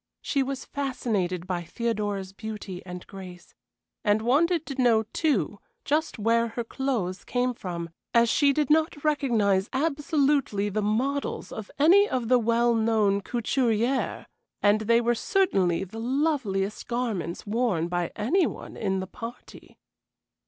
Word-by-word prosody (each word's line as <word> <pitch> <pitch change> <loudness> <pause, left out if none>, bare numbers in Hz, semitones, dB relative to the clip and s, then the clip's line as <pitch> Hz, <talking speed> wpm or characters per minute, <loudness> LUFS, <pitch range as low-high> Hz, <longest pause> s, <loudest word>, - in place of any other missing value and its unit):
She 280 - 0
was 270 0 -3
fascinated 215 -11 -2
by 180 -2 -2
Theodora's 205 0 -3
beauty 210 -4 -7
and 180 0 -7
grace, 185 -3 -11 0.5
and 210 +1 +2
wanted 320 +7 +2
to 275 -2 -3
know, 230 -3 +4
too, 215 - 0 0.3
just 310 +3 0
where 230 +2 +2
her 230 +1 -4
clothes 230 -8 -2
came 250 0 0
from, 170 -6 -6 0.2
as 235 0 +5
she 280 +4 +4
did 295 0 0
not 310 -2 +2
recognize 225 -10 +2
absolutely 280 -7 +1
the 215 +2 -1
models 255 +7 -1
of 215 -2 -7
any 375 +8 +6
of 245 -3 -2
the 250 -1 +5
well 235 +1 +2
known 220 -3 +2
couturières, 240 +2 0 0.3
and 205 +1 +3
they 230 +2 +3
were 240 0 +2
certainly 200 - +1
the 195 +4 -8
loveliest 235 -6 -1
garments 225 -8 -2
worn 210 -6 0
by 175 -1 -2
any 330 - +2
one - - -8
in 190 -3 -1
the - - -4
party. 230 +5 -10
230 Hz, 140 wpm, -26 LUFS, 200-270 Hz, 0.5 s, any